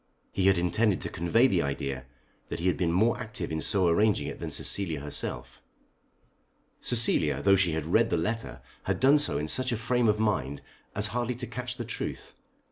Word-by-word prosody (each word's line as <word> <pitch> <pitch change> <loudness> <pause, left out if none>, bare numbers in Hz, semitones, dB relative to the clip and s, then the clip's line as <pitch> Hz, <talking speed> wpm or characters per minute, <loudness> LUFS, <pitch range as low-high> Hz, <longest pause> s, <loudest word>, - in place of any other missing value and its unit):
He 95 -1 +1
had 95 -1 +5
intended 90 +3 +1
to - - -3
convey 100 +9 +2
the 95 -10 +2
idea 70 -2 -3 0.4
that - - -4
he 85 - -4
had 90 - +3
been 85 -3 0
more 110 +7 +2
active 110 -5 -5
in 80 0 -2
so 95 +4 +3
arranging 105 +5 +2
it - - -6
than - - -4
Cecilia 85 -7 -2
herself. 70 -4 -3 1.2
Cecilia 75 - +2
though 100 - +6
she 90 -4 +2
had 80 -1 -2
read 110 +7 +3
the - - +1
letter 110 +8 -3 0.2
had - - -1
done 140 +3 +5
so 75 - 0
in 75 +2 -2
such 130 +9 0
a 120 - 0
frame 120 +1 +1
of 105 0 +3
mind 85 -11 -1 0.3
as 105 0 +1
hardly 120 0 -1
to 125 +1 -4
catch 125 0 -4
the 120 - -4
truth. 115 - -5
100 Hz, 200 wpm, -28 LUFS, 80-115 Hz, 1.2 s, though